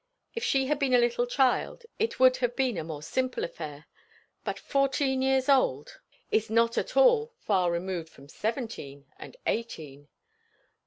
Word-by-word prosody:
If 460 - -4
she 270 -1 +2
had 295 +2 0
been 265 -3 +2
a - - +7
little 240 0 +2
child 265 - +1
it 450 +2 -1
would 255 0 +6
have 245 -1 -1
been 260 -4 +1
a 165 - -3
more 155 -2 -7
simple 255 +9 -2
affair; 150 -3 -7 0.6
but - - -3
fourteen 275 -1 0
years 265 0 +2
old 255 - +2 0.3
is 220 -1 +1
not 230 +1 +2
at - - -2
all 475 -2 +4
far 185 - +1
removed 170 -1 -3
from 140 -3 -16
seventeen, 210 - -5
and - - -11
eighteen. 150 -11 -4
240 Hz, 160 wpm, -28 LUFS, 170-265 Hz, 0.6 s, a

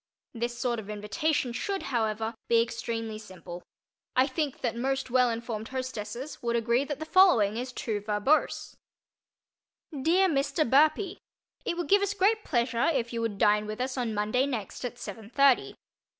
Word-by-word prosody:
This 240 0 -3
sort 240 -2 -1
of 210 -1 -9
invitation 215 +6 -1
should, 390 - -2
however, 220 -1 0
be 230 - +4
extremely 230 -1 -2
simple. 180 -4 -10 0.5
I 255 - +5
think 285 0 -3
that 235 -3 -1
most 265 +1 -2
well 250 -1 +4
informed 225 -1 -4
hostesses 255 0 -5
would 235 -1 0
agree 235 +3 +2
that 290 -1 -4
the 315 - -5
following 315 - +5
is 250 +2 -4
too 225 -4 -3
verbose: 210 +8 +1 1.2
DEAR 330 +7 +3
MR. 305 -1 +1
BURPEE. 310 - +3 0.5
It 340 - -1
would 350 - -2
give 400 +1 +5
us 400 +1 0
great 420 +3 +2
pleasure 235 -2 +1
if 240 -5 -1
you 230 - -2
would 225 -3 -2
dine 210 +1 +3
with 215 0 -5
us 255 +1 -2
on 240 -4 -2
Monday 215 +6 +1
next 235 -6 -5
at 245 -1 -4
seven 220 -3 -8
thirty. 275 0 +3
240 Hz, 165 wpm, -28 LUFS, 220-275 Hz, 1.2 s, I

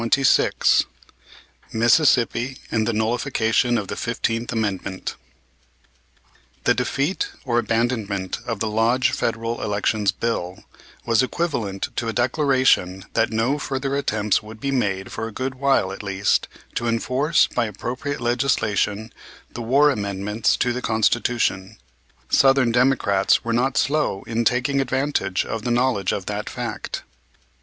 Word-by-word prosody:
CHAPTER 115 +4 +2
XXVI 135 - +3 0.9
MISSISSIPPI 120 +1 +3
AND 110 -1 +1
THE 115 - +1
NULLIFICATION 115 +1 +1
OF 100 - -3
THE - - -4
FIFTEENTH 115 0 -2
AMENDMENT 100 -4 -3 1.5
The - - +4
defeat 170 - -1 0.2
or 120 -2 +2
abandonment 110 -5 -1
of 115 -3 -3
the 110 - -1
Lodge 115 +5 +2
Federal 115 +1 -2
Elections 105 0 0
Bill 100 -2 -3 0.4
was 115 0 +3
equivalent 125 - -2
to 115 - -1
a 110 - -2
declaration 125 - +2
that 115 - +2
no 120 +6 0
further 135 0 -2
attempts 105 -7 +1
would 110 +1 -11
be 140 +4 -2
made 100 -7 -1
for 110 - -4
a - - -8
good 130 +4 -3
while, 135 -7 +1
at 95 - -7
least, 100 0 0 0.3
to 120 - -2
enforce 130 +7 +2
by 120 - -1
appropriate 125 +7 -4
legislation 115 -3 0 0.4
the 120 - -5
war 140 +6 +4
amendments 105 -1 -1
to 120 - +1
the 125 - -4
Constitution. 110 -3 0 0.5
Southern 135 -3 +4
Democrats 115 -6 +2
were 115 - 0
not 125 +3 +1
slow 145 -9 +1
in 115 0 -2
taking 130 +4 +2
advantage 130 -8 -1
of 115 - -4
the 120 - -3
knowledge 120 -5 +1
of - - -3
that - - -4
fact. - - -5
115 Hz, 135 wpm, -22 LUFS, 105-130 Hz, 1.5 s, The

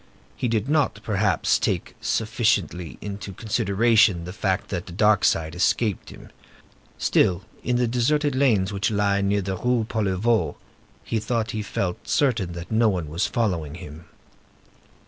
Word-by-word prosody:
He 125 - -2
did 110 0 0
not, 145 -8 +1
perhaps, 105 -2 +1
take - - -1
sufficiently 100 - 0
into 100 -1 -6
consideration 105 -3 +2
the 90 - -7
fact 100 -2 -1
that 90 -2 -4
the - - -8
dark 105 +2 +3
side 80 0 +1
escaped 100 +3 0
him. - - -13 0.7
Still, 95 0 +2 0.2
in 125 - 0
the 125 0 +2
deserted 145 +5 +1
lanes 110 -8 +2
which 100 +1 0
lie 100 -2 +1
near 100 0 +1
the 95 0 -3
Rue 120 +1 +1
Poliveau, 110 +1 0 0.5
he 115 - -1
thought 115 +1 -1
he 110 - -3
felt 95 -3 -3
certain 115 -11 +1
that 85 +3 -8
no 110 0 +4
one 90 -6 -2
was 85 +5 0
following 90 - -1
him. 80 -1 -10
105 Hz, 150 wpm, -24 LUFS, 90-115 Hz, 0.7 s, no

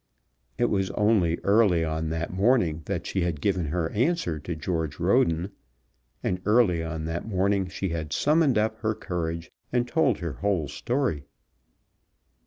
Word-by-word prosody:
It 120 - +1
was 95 -2 +1
only 100 -6 +3
early 100 -5 +4
on 80 0 -2
that 80 +2 -3
morning 95 -6 +2
that - - -3
she 95 - -1
had 85 -4 -1
given 95 0 0
her 80 +1 -1
answer 120 - 0
to 85 +3 -5
George 80 -2 -3
Roden, 85 +4 +2 0.7
and 90 0 -1
early 105 -5 +3
on 80 -1 -4
that 80 +5 -4
morning 100 -1 +1
she 95 +1 -3
had 80 -2 -4
summoned 150 -4 +3
up 110 +1 +1
her 110 -1 -1
courage, 85 -3 -4 0.2
and 120 0 +1
told 140 - +2
her 85 -4 -4
whole 85 +3 -1
story. 80 - -2
90 Hz, 155 wpm, -26 LUFS, 80-110 Hz, 0.7 s, early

